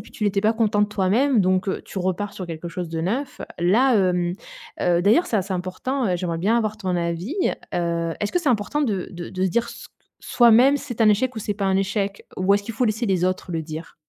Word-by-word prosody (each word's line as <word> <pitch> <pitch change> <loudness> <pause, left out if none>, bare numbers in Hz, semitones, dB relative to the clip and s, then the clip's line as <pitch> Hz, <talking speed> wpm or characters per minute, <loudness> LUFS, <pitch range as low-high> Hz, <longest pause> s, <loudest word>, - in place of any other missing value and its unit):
puis - - -13
tu 215 - -4
n'étais 200 -1 +1
pas 220 +2 +3
content 220 -2 +1
de 210 - +3
toi-même, 215 +5 +2
donc, 185 +1 +1
heu, - - -2
tu 190 - -5
repars 185 +3 -2
sur 185 - -6
quelque 165 -1 -7
chose 170 0 -5
de 160 0 -3
neuf. 240 - -3 0.2
Là, 235 +9 +4
hem, 180 -3 +2 0.5
heu 175 -1 +2
d'ailleurs, 225 - +4
c'est 220 - 0
assez 195 0 -2
important, 185 +9 -2
heu, 180 - +1
j'aimerais 170 -2 -3
bien 210 +7 +2
avoir 215 -2 -1
ton 185 -5 -2
avis. 170 - -3 0.4
Heu, 170 -2 -1
est-ce 205 - -2
que 355 - +1
c'est 310 - 0
important 245 +5 0
de 205 -9 -1
de 175 -1 -7
de 185 0 -4
se - - +2
dire 235 +6 0
ce - - -10
que - - -44 0.3
soi-même, 240 +4 +5
c'est 260 -5 -7
un 220 - +6
échec 245 +4 +1
ou - - -2
c'est 205 -1 -3
pas 200 -1 -2
un 190 0 +2
échec, 200 +1 -2
ou 185 +2 +2
est-ce 200 0 +2
qu'il 230 +1 -6
faut 250 - +1
laisser 220 +1 0
les 185 -2 +1
autres 185 -1 -2
le 160 -1 -2
dire? 160 +1 -8
200 Hz, 250 wpm, -23 LUFS, 180-225 Hz, 0.5 s, un